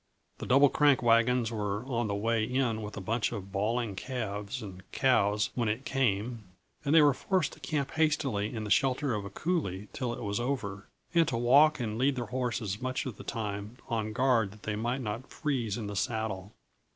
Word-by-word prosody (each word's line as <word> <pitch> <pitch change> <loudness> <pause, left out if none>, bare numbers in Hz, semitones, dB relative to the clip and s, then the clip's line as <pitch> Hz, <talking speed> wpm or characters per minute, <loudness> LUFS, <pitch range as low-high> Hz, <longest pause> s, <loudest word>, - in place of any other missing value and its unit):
The - - -5
Double 140 +2 +6
Crank 145 -3 +4
wagons 115 0 +3
were 105 0 -2
on 120 -4 -1
the 100 - -1
way 115 +2 +1
in 125 -2 0
with 105 0 -7
a - - -4
bunch 110 +3 0
of 100 -1 -6
bawling 110 +2 -1
calves 105 0 -4
and 95 -3 -9
cows 105 -5 +2
when 120 -3 0
it 115 +6 -2
came, 115 -3 0 0.4
and 145 +2 +2
they 160 - +8
were 145 -2 +6
forced 180 +5 0
to - - -14
camp 145 -1 -2
hastily 140 -10 +1
in 110 -3 -4
the 105 - -5
shelter 135 +1 +2
of 105 -2 -3
a - - -5
coulée 105 - -2
till 125 -3 -2
it 120 - -5
was 100 0 -1
over, 110 -6 -3 0.3
and 165 -2 +4
to 115 - -1
walk 140 +6 +5
and 110 -2 -3
lead 135 +2 +3
their 120 -1 -3
horses 115 -4 -2
much 130 +1 -2
of 125 -7 -5
the - - -9
time 105 0 -4
on 110 -2 -1
guard 120 -3 +2
that 105 +2 -16
they 105 - -2
might 120 +5 -1
not 115 +3 -4
freeze 125 -9 -2
in 115 - -4
the 100 0 -5
saddle. 105 -2 -2
115 Hz, 205 wpm, -30 LUFS, 105-130 Hz, 0.4 s, they